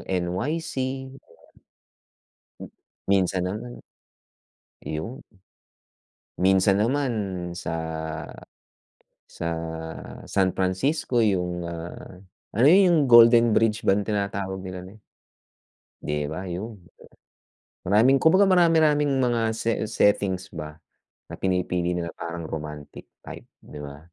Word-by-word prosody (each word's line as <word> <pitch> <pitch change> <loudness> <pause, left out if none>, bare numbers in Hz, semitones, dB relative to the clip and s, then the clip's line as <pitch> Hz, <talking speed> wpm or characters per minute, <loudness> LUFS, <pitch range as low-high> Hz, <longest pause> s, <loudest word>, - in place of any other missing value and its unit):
NYC. 95 - -2 2.3
Minsan 95 -2 +1
naman, 110 +6 -5 1.1
'yon. 115 - -6 1.2
Minsan 95 +1 +3
naman 130 +3 +1 0.4
sa 85 -1 -5 1.5
sa 85 - -6 0.8
San 95 -2 +1
Francisco, 120 - -1
'yung, 90 -3 -1
ah, 85 +2 -8 0.4
ano 115 +6 +3
'yun 190 +4 +7
'yung 175 -3 +4
Golden 120 0 +8
Bridge 110 0 +2
bang 100 +1 +2
tinatawag 100 -2 -3
nila 90 -1 -7
nun? 100 +3 -15 1.0
'Di 75 0 -2
ba 90 +4 -5
'yun, 100 +5 -6 1.0
maraming 120 +8 +4
kumbaga 185 +5 +5
marami-raming 160 -6 +3
mga 120 -3 +1 0.5
settings 100 -3 +1
ba 75 -2 -7 0.5
na - - -8
pinipili 90 -2 -1
nila 85 -1 -3
parang 85 -1 -6
romantic 75 -2 -7 0.2
type, - - -10 0.2
'di 75 - -11
ba. 70 0 -9
95 Hz, 95 wpm, -25 LUFS, 90-120 Hz, 2.3 s, Golden